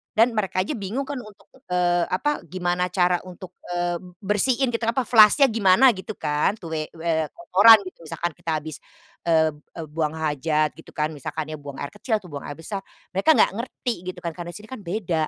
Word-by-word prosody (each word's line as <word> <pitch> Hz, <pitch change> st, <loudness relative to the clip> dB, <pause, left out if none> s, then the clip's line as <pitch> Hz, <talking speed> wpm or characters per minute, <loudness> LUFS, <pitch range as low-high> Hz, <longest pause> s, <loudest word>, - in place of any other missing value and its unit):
dan 230 Hz, +3 st, +5 dB
mereka 195 Hz, -3 st, -1 dB
aja -, -, -4 dB
bingung 210 Hz, +8 st, -3 dB
kan 280 Hz, -1 st, -5 dB
untuk, 215 Hz, -4 st, -14 dB, 0.2 s
eee, 175 Hz, -1 st, +2 dB
apa 295 Hz, +11 st, 0 dB
gimana 180 Hz, +1 st, -1 dB
cara 180 Hz, -1 st, +2 dB
untuk, 180 Hz, 0 st, -10 dB, 0.2 s
eee, 175 Hz, 0 st, -1 dB, 0.2 s
bersihin 240 Hz, +6 st, +2 dB
gitu 230 Hz, -, -1 dB
kenapa, 235 Hz, +3 st, +1 dB
flush-nya 225 Hz, +5 st, +7 dB
gimana 225 Hz, +4 st, +5 dB
gitu 195 Hz, +3 st, -7 dB
kan, 150 Hz, +7 st, 0 dB
tuh, 165 Hz, -3 st, -8 dB
eee 155 Hz, -1 st, -2 dB
eee, 160 Hz, -1 st, 0 dB
kotoran 310 Hz, -9 st, +7 dB
gitu, -, -, -11 dB
misalkan 170 Hz, +2 st, -3 dB
kita 165 Hz, -, -4 dB
habis, 155 Hz, -2 st, -7 dB, 0.5 s
eee 160 Hz, -1 st, +4 dB, 0.2 s
eee, 165 Hz, -2 st, -6 dB
buang 155 Hz, -1 st, -1 dB
hajat 155 Hz, 0 st, 0 dB
gitu -, -, -14 dB
kan, 155 Hz, 0 st, 0 dB
misalkan 155 Hz, +1 st, -5 dB
buang 145 Hz, -1 st, -9 dB
air 140 Hz, -, -5 dB
kecil 220 Hz, +2 st, -2 dB
atau 185 Hz, -, -14 dB
buang 140 Hz, -1 st, -6 dB
air 145 Hz, -, -6 dB
besar 180 Hz, +6 st, -5 dB, 0.3 s
mereka 195 Hz, +12 st, +4 dB
enggak -, -, +4 dB
ngerti 240 Hz, 0 st, -3 dB
gitu 185 Hz, -1 st, -5 dB
kan 170 Hz, -, -2 dB
karena 175 Hz, +1 st, -7 dB
sini 210 Hz, +1 st, -11 dB
kan 260 Hz, -, -6 dB
beda. 175 Hz, -5 st, -2 dB
180 Hz, 195 wpm, -24 LUFS, 160-215 Hz, 0.5 s, flush-nya